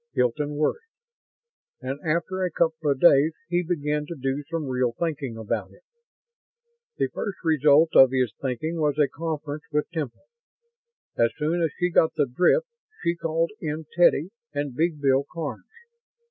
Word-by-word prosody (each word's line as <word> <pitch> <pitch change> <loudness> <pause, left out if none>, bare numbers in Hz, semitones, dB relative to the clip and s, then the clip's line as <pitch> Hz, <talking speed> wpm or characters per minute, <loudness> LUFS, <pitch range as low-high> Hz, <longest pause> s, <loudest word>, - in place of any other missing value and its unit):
Hilton 145 +4 0
worried. 155 - 0 1.0
And 135 0 -5
after 170 +4 -1
a 180 - +1
couple 160 -2 0
of 140 -2 +1
days 155 -1 +5 0.2
he 175 0 +2
began 150 -4 -2
to 170 - -6
do 135 +2 -1
some 165 -2 -2
real 125 -2 0
thinking 140 -5 -3
about 110 -2 -3
it. - - -21 1.1
The - - 0
first 200 -2 -4
result 155 0 +5
of 130 - +9
his 130 -4 0
thinking 140 +6 -2
was 150 -2 +1
a 150 -2 +4
conference 155 +1 -5
with 150 0 0
Temple. 155 - -5 0.9
As 115 - +4
soon 160 +3 0
as 165 - +2
she 180 0 0
got 160 -1 +3
the 145 - +2
drift, 180 - +2 0.4
she 170 0 +2
called 165 +1 -1
in 155 -1 -4
Teddy 175 0 +4 0.2
and 145 -2 -3
Big 160 +3 0
Bill 135 -1 +3
Karns. 160 -4 -5
150 Hz, 160 wpm, -25 LUFS, 140-165 Hz, 1.1 s, of